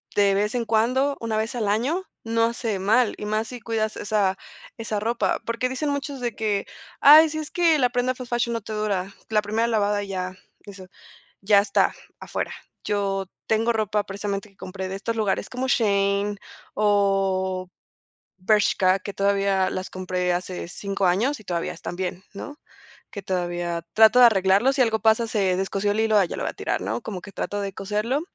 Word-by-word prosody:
de 200 Hz, -1 st, +4 dB
vez 210 Hz, +3 st, 0 dB
en 240 Hz, -2 st, -1 dB
cuando, 255 Hz, +6 st, +2 dB
una 225 Hz, -1 st, -1 dB
vez 220 Hz, +4 st, -2 dB
al 220 Hz, -4 st, -1 dB
año, 265 Hz, -, 0 dB, 0.2 s
no 230 Hz, 0 st, +1 dB
hace 230 Hz, -2 st, -1 dB
mal, 215 Hz, +5 st, +2 dB
y -, -, -8 dB
más 215 Hz, +1 st, -1 dB
si 245 Hz, 0 st, -8 dB
cuidas 220 Hz, -1 st, -2 dB
esa 205 Hz, -3 st, 0 dB, 0.4 s
esa 220 Hz, -2 st, -3 dB
ropa, 230 Hz, +3 st, 0 dB
porque 235 Hz, +2 st, -1 dB
dicen 285 Hz, +3 st, -2 dB
muchos 285 Hz, -1 st, -3 dB
de 240 Hz, -3 st, -3 dB
que: 210 Hz, -3 st, -1 dB, 0.3 s
"Ay, 310 Hz, +2 st, +9 dB
sí, 310 Hz, -, -5 dB
es 310 Hz, -1 st, -5 dB
que 335 Hz, -4 st, +3 dB
la 250 Hz, -, +3 dB
prenda 245 Hz, +1 st, 0 dB
fast 250 Hz, -1 st, -9 dB
fashion 240 Hz, 0 st, 0 dB
no 230 Hz, -, -1 dB
te 215 Hz, +2 st, -7 dB
dura, 200 Hz, -3 st, -2 dB, 0.2 s
la 215 Hz, -1 st, +2 dB
primera 220 Hz, +3 st, 0 dB
lavada 205 Hz, -2 st, +1 dB
ya 185 Hz, -2 st, -4 dB, 0.3 s
eso, 190 Hz, -2 st, -11 dB, 0.5 s
ya 200 Hz, +1 st, +4 dB
está 200 Hz, 0 st, +2 dB, 0.3 s
afuera", -, -, -4 dB, 0.3 s
yo 195 Hz, -2 st, -1 dB, 0.2 s
tengo 225 Hz, +2 st, +2 dB
ropa 215 Hz, -2 st, 0 dB
precisamente 200 Hz, +1 st, -4 dB
que 195 Hz, -, -30 dB
compré 190 Hz, 0 st, -6 dB
de 190 Hz, -, -5 dB
estos 225 Hz, +4 st, -3 dB
lugares, 210 Hz, -3 st, -1 dB
como 255 Hz, +1 st, -3 dB
Shein 200 Hz, -3 st, +1 dB, 0.4 s
o 195 Hz, -3 st, +1 dB, 0.8 s
Bershka, 195 Hz, -2 st, +3 dB
que 200 Hz, +1 st, -7 dB
todavía 195 Hz, -1 st, +1 dB
las 185 Hz, 0 st, -4 dB
compré 180 Hz, -1 st, -2 dB
hace 180 Hz, 0 st, -4 dB
5 200 Hz, +1 st, -2 dB
años 235 Hz, +11 st, +1 dB
y -, -, -15 dB
todavía 170 Hz, -2 st, -2 dB
están 175 Hz, +1 st, -7 dB
bien, 185 Hz, 0 st, -4 dB
¿no?, 290 Hz, +9 st, -8 dB, 0.5 s
que 200 Hz, -, -7 dB
todavía 175 Hz, -2 st, -2 dB
trato 220 Hz, +2 st, +6 dB
de 250 Hz, -, +9 dB
arreglarlos, 200 Hz, +4 st, +4 dB
si 275 Hz, -, +2 dB
algo 225 Hz, -3 st, +2 dB
pasa, 220 Hz, +2 st, +3 dB
se 195 Hz, -5 st, +1 dB
descosió 195 Hz, +2 st, -1 dB
el 210 Hz, -, -1 dB
hilo, 220 Hz, -1 st, +3 dB
ah, 200 Hz, -, +5 dB
ya -, -, -6 dB
lo -, -, -3 dB
va -, -, -1 dB
a -, -, -7 dB
tirar, -, -, -2 dB
¿no?, 110 Hz, +5 st, -3 dB
como 190 Hz, -5 st, -6 dB
que 200 Hz, -, -11 dB
trato 205 Hz, +1 st, -3 dB
de 195 Hz, -1 st, -4 dB
coserlo 210 Hz, +9 st, -1 dB
210 Hz, 195 wpm, -24 LUFS, 195-230 Hz, 0.8 s, Ay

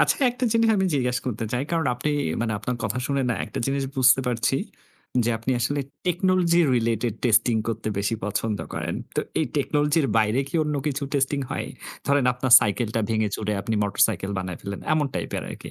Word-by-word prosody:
আচ্ছা -, -, +2 dB
একটা 245 Hz, +1 st, -3 dB
জিনিস 230 Hz, 0 st, +3 dB
আমি 190 Hz, -, +2 dB
জিজ্ঞাসা 125 Hz, -2 st, 0 dB
করতে 115 Hz, -3 st, -2 dB
চাই? 125 Hz, +2 st, 0 dB
কারণ 165 Hz, -3 st, 0 dB
আপনি 125 Hz, +5 st, -3 dB, 0.5 s
আপনার 125 Hz, +4 st, -3 dB
কথা 110 Hz, +3 st, -1 dB
শুনে 140 Hz, -1 st, 0 dB
না 120 Hz, -, +1 dB
একটা 110 Hz, -, -7 dB
জিনিস 135 Hz, 0 st, 0 dB
বুঝতে 130 Hz, 0 st, +6 dB
পারছি। 115 Hz, -2 st, +1 dB, 0.7 s
যে 120 Hz, -, +1 dB
আপনি 115 Hz, +4 st, -3 dB
আসলে 145 Hz, +5 st, 0 dB, 0.3 s
technology-related 165 Hz, -, +2 dB
testing 115 Hz, 0 st, +4 dB
করতে 110 Hz, -1 st, -3 dB
বেশি 100 Hz, +3 st, 0 dB
পছন্দ 105 Hz, +1 st, -1 dB, 0.2 s
করেন। -, -, -3 dB, 0.2 s
তো -, -, +3 dB, 0.2 s
এই 155 Hz, -, +1 dB
টেকনোলজির 150 Hz, +1 st, +2 dB
বাইরে 110 Hz, +3 st, +3 dB
কি -, -, -16 dB
অন্য 150 Hz, 0 st, -2 dB
কিছু 145 Hz, -1 st, -1 dB
টেস্টিং 140 Hz, +1 st, +1 dB
হয়? -, -, -3 dB, 0.4 s
ধরেন 140 Hz, -1 st, +3 dB
আপনার 125 Hz, 0 st, 0 dB
সাইকেলটা 110 Hz, +2 st, -1 dB
ভেঙে-চুরে 110 Hz, -1 st, -1 dB
আপনি 115 Hz, -, -2 dB
মোটরসাইকেল 100 Hz, -1 st, +1 dB
বানায় 90 Hz, -2 st, -4 dB
ফেললেন 100 Hz, 0 st, -6 dB
এমন 150 Hz, -2 st, +2 dB
টাইপের -, -, -3 dB
আরকি -, -, -8 dB
125 Hz, 175 wpm, -24 LUFS, 110-145 Hz, 0.7 s, বুঝতে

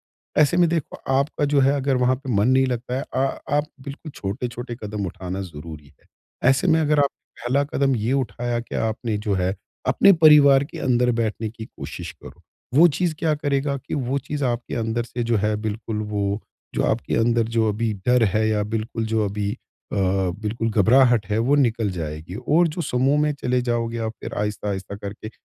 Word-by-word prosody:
देखो -, -, -3 dB
ऐसे 150 Hz, +4 st, +2 dB
में 175 Hz, -1 st, +4 dB
देखो 165 Hz, -3 st, -2 dB, 0.2 s
आपका 140 Hz, +2 st, 0 dB
जो 145 Hz, -1 st, +3 dB
है 135 Hz, +1 st, +4 dB
अगर 135 Hz, -1 st, +1 dB
वहाँ 125 Hz, +1 st, +2 dB
पे 135 Hz, 0 st, -7 dB
मन 100 Hz, +3 st, +3 dB
नहीं 130 Hz, +1 st, +4 dB
लगता 125 Hz, 0 st, -3 dB
है 135 Hz, -, -2 dB
अ, 135 Hz, +1 st, 0 dB, 0.2 s
आप 145 Hz, 0 st, +2 dB, 0.2 s
बिल्कुल 140 Hz, +3 st, -8 dB
छोटे-छोटे 120 Hz, +4 st, -4 dB
कदम 105 Hz, -1 st, -3 dB
उठाना 95 Hz, +1 st, -5 dB
ज़रूरी 75 Hz, -3 st, -9 dB
है। -, -, -30 dB, 0.4 s
ऐसे 135 Hz, +7 st, +2 dB
में 160 Hz, 0 st, +4 dB
अगर 150 Hz, -1 st, +2 dB
आपने 140 Hz, -, -3 dB
पहला 130 Hz, +4 st, +2 dB
कदम 140 Hz, -1 st, +1 dB
ये 115 Hz, +3 st, -1 dB
उठाया 120 Hz, -2 st, -1 dB
कि 120 Hz, -, -10 dB
आपने 110 Hz, 0 st, -1 dB
जो 105 Hz, -1 st, -1 dB
है 95 Hz, 0 st, 0 dB, 0.3 s
अपने 130 Hz, +10 st, +6 dB
परिवार 140 Hz, -3 st, +7 dB
के -, -, -10 dB
अंदर 125 Hz, -1 st, +2 dB
बैठने 110 Hz, 0 st, -2 dB
की 115 Hz, 0 st, -9 dB
कोशिश -, -, -8 dB
करो। -, -, -13 dB, 0.4 s
वो 170 Hz, -, +9 dB
चीज़ 170 Hz, +1 st, -1 dB
क्या 160 Hz, -2 st, +1 dB
करेगा 145 Hz, -1 st, -1 dB
कि 135 Hz, -, -6 dB
वो 135 Hz, -1 st, -1 dB
चीज़ 145 Hz, +1 st, -4 dB
आपके 120 Hz, -1 st, -2 dB
अंदर 115 Hz, 0 st, -1 dB
से 120 Hz, +1 st, -4 dB
जो 115 Hz, 0 st, +1 dB
है 105 Hz, 0 st, +2 dB
बिल्कुल 110 Hz, 0 st, -3 dB
वो 100 Hz, 0 st, -1 dB, 0.3 s
जो -, -, +1 dB
आपके 115 Hz, -, 0 dB
अंदर 115 Hz, 0 st, +2 dB
जो 110 Hz, -1 st, +3 dB
अभी 110 Hz, +1 st, 0 dB
डर 125 Hz, -1 st, +4 dB
है 110 Hz, +1 st, +2 dB
या 105 Hz, -1 st, +1 dB
बिल्कुल 115 Hz, +1 st, -2 dB
जो 110 Hz, -1 st, +1 dB
अभी 100 Hz, 0 st, -2 dB, 0.4 s
अ, -, -, -2 dB
बिल्कुल 100 Hz, +4 st, 0 dB
घबराहट 115 Hz, +1 st, +4 dB
है 105 Hz, -, +1 dB
वो 125 Hz, +5 st, +3 dB
निकल 115 Hz, -6 st, +2 dB
जाएगी। 80 Hz, 0 st, -6 dB
और 155 Hz, +9 st, +2 dB
जो 165 Hz, +3 st, -5 dB
समूह 135 Hz, +1 st, +2 dB
में 150 Hz, 0 st, +2 dB
चले 125 Hz, 0 st, +1 dB
जाओगे 115 Hz, -1 st, -1 dB
आप 110 Hz, -, -3 dB
फ़िर -, -, -5 dB
आहिस्ता-आहिस्ता 100 Hz, -1 st, -3 dB
करके 105 Hz, +2 st, -7 dB
120 Hz, 200 wpm, -23 LUFS, 105-135 Hz, 0.4 s, वो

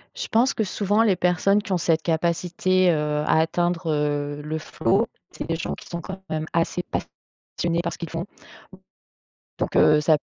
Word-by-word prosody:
Je -, -, -4 dB
pense 245 Hz, +4 st, +3 dB
que 220 Hz, -, 0 dB
souvent, 205 Hz, +2 st, +1 dB
les 200 Hz, -5 st, +3 dB
personnes 180 Hz, +3 st, +2 dB
qui 205 Hz, -2 st, -3 dB
ont -, -, +3 dB
cette 165 Hz, -1 st, +1 dB
capacité, 175 Hz, +3 st, +1 dB
heu, 150 Hz, -2 st, +1 dB
à -, -, +4 dB
atteindre, 175 Hz, +1 st, 0 dB
heu, 145 Hz, -1 st, -1 dB
le 155 Hz, +2 st, -3 dB
flow, 155 Hz, -, 0 dB, 0.2 s
c'est -, -, -6 dB
des 165 Hz, -, -2 dB
gens 165 Hz, -, -3 dB
qui -, -, -10 dB
sont 170 Hz, -, -5 dB
quand 190 Hz, +2 st, -8 dB
même 155 Hz, 0 st, -2 dB
assez 170 Hz, +1 st, 0 dB
passionnés 170 Hz, -1 st, -4 dB
par 170 Hz, -, -3 dB
ce -, -, -7 dB
qu'ils 170 Hz, -, -6 dB
font, 165 Hz, +1 st, -4 dB, 1.3 s
donc -, -, -2 dB
heu, 150 Hz, 0 st, +6 dB
ça 155 Hz, 0 st, +4 dB
170 Hz, 185 wpm, -24 LUFS, 155-185 Hz, 1.3 s, heu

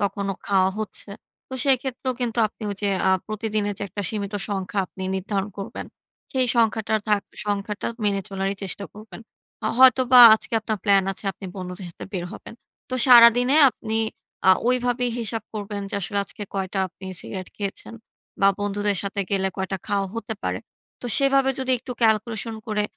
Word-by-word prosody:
তখনো 200 Hz, -1 st, -1 dB
খাওয়া 190 Hz, -1 st, +3 dB
হচ্ছে। 215 Hz, -1 st, -6 dB, 0.4 s
তো 260 Hz, -, -6 dB
সেক্ষেত্রেও 260 Hz, -1 st, +1 dB
কিন্তু 240 Hz, -1 st, -1 dB
আপনি 220 Hz, -, -16 dB
ওইযে 200 Hz, +1 st, -2 dB, 0.2 s
আ -, -, +5 dB, 0.2 s
প্রতিদিনের 215 Hz, -1 st, -2 dB
যে -, -, -5 dB
একটা 205 Hz, +3 st, -5 dB
সীমিত 205 Hz, -1 st, -4 dB
সংখ্যা 195 Hz, 0 st, -3 dB
আপনি 190 Hz, -, -10 dB
নির্ধারণ 195 Hz, +1 st, -2 dB
করবেন। 195 Hz, -, -6 dB, 0.5 s
সেই 260 Hz, -1 st, +2 dB
সংখ্যাটার 220 Hz, -1 st, +2 dB
থাক 205 Hz, -1 st, +3 dB, 0.2 s
সংখ্যাটা 205 Hz, 0 st, -2 dB, 0.2 s
মেনে 200 Hz, -1 st, +1 dB
চলারই 195 Hz, 0 st, -2 dB
চেষ্টা 195 Hz, +1 st, -5 dB
করবেন। 215 Hz, +2 st, -12 dB, 0.4 s
আ -, -, +1 dB
হয়তোবা 255 Hz, -1 st, +7 dB
আজকে 220 Hz, -, -5 dB
আপনার 220 Hz, -1 st, -3 dB
প্ল্যান 200 Hz, -2 st, +4 dB
আছে 195 Hz, -, -9 dB
আপনি 190 Hz, +1 st, -10 dB
বন্ধুদের 180 Hz, 0 st, -6 dB
সাথে -, -, -10 dB
বের 175 Hz, -2 st, -3 dB
হবেন। -, -, -10 dB, 0.4 s
তো 255 Hz, -, -1 dB
সারাদিনে 245 Hz, +3 st, +7 dB
আপনি 220 Hz, -1 st, -4 dB, 0.5 s
আ -, -, +10 dB, 0.2 s
ঐভাবেই 245 Hz, -1 st, +1 dB
হিসাব 225 Hz, 0 st, -3 dB
করবেন 205 Hz, -1 st, -4 dB
যে -, -, -4 dB
আসলে 200 Hz, +2 st, -2 dB
আজকে 205 Hz, -, -8 dB
কয়টা 195 Hz, 0 st, -2 dB
আপনি 190 Hz, +2 st, -12 dB
সিগারেট 185 Hz, -2 st, -7 dB
খেয়েছেন, 200 Hz, +2 st, -5 dB, 0.5 s
বা 195 Hz, -, +6 dB
বন্ধুদের 205 Hz, 0 st, 0 dB
সাথে 200 Hz, 0 st, -3 dB
গেলে 190 Hz, -1 st, +1 dB
কয়টা 190 Hz, 0 st, -2 dB
খাওয়া 200 Hz, -1 st, 0 dB
হতে 230 Hz, -1 st, -4 dB
পারে। -, -, -1 dB, 0.4 s
তো 245 Hz, -, -5 dB
সেভাবে 275 Hz, -1 st, +3 dB
যদি 260 Hz, 0 st, -2 dB
একটু 250 Hz, +1 st, -7 dB
ক্যালকুলেশন 220 Hz, 0 st, +1 dB
করে 210 Hz, -1 st, 0 dB
210 Hz, 165 wpm, -23 LUFS, 195-230 Hz, 0.5 s, আ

